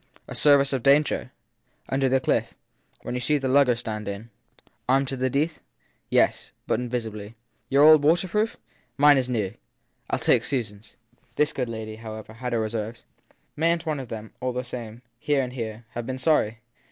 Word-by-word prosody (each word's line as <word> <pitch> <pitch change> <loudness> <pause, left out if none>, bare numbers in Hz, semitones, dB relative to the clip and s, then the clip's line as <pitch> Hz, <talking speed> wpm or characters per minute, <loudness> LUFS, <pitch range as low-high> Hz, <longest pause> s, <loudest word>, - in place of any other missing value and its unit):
A - - -7
service 140 -2 +5
of 130 - 0
danger? 140 +4 +2 0.6
Under 135 0 +1
the 130 +1 +3
cliff - - 0 0.5
when - - -4
you 125 - -2
see 150 +4 +2
the 135 -2 -2
lugger 130 -2 +4
stand 110 -3 -5
in! 100 +3 -6 0.6
Armed 135 +1 +3
to 135 - -2
the 130 0 0
teeth? 150 +5 0
t - - -30 0.5
Yes - - +2
but - - 0
invisibly. 115 -3 -5 0.3
Your 140 +2 +5
old 155 -1 +8
waterproof! 185 +8 +2 0.4
Mine 145 -1 +6
is 130 -1 -2
new. 105 -5 -1 0.6
I - - +1
ll - - -4
take - - +3
Susan 115 -7 -2
s! 105 - -20 0.4
This 150 -1 +2
good 125 -3 -2
lady, 110 -1 -6
however, 110 -1 -9
had 125 +2 -5
her 115 - +1
reserves. 110 +1 -4 0.5
Mayn 165 +2 +2
t 165 - -11
one 155 -3 -2
of 130 - -6
them, 110 -1 -8
all 125 0 -2
the 125 +1 -3
same 120 -1 -8 0.2
here 140 +1 +1
and 125 0 -6
there 115 -1 -5
have 120 -1 -5
been 130 0 -3
sorry 115 -6 +1
125 Hz, 190 wpm, -25 LUFS, 110-140 Hz, 0.6 s, old